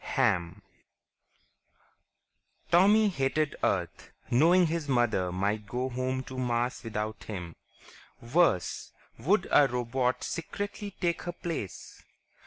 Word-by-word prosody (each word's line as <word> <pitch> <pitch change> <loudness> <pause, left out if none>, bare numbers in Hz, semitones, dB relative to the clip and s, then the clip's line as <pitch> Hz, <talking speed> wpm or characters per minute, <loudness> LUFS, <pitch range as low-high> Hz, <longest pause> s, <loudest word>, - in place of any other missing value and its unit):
Hamm_ 90 +3 +1 2.1
Tommy 205 +5 +5
hated 145 -2 0
Earth, 90 -3 -1 0.2
knowing 170 +8 +5
his 160 -2 -2
mother 110 -8 +1
might 100 +3 -1
go 125 +5 -2
home 130 +1 -2
to 130 0 -7
Mars 120 0 -1
without 110 -1 -4
him. 90 -6 -6 0.6
Worse, 120 - +1 0.3
would - - +2
a 145 - +6
robot 125 +1 -1
secretly 205 +3 -5
take 170 -2 0
her 175 - -5
place?... 160 - -6
130 Hz, 105 wpm, -29 LUFS, 105-165 Hz, 2.1 s, a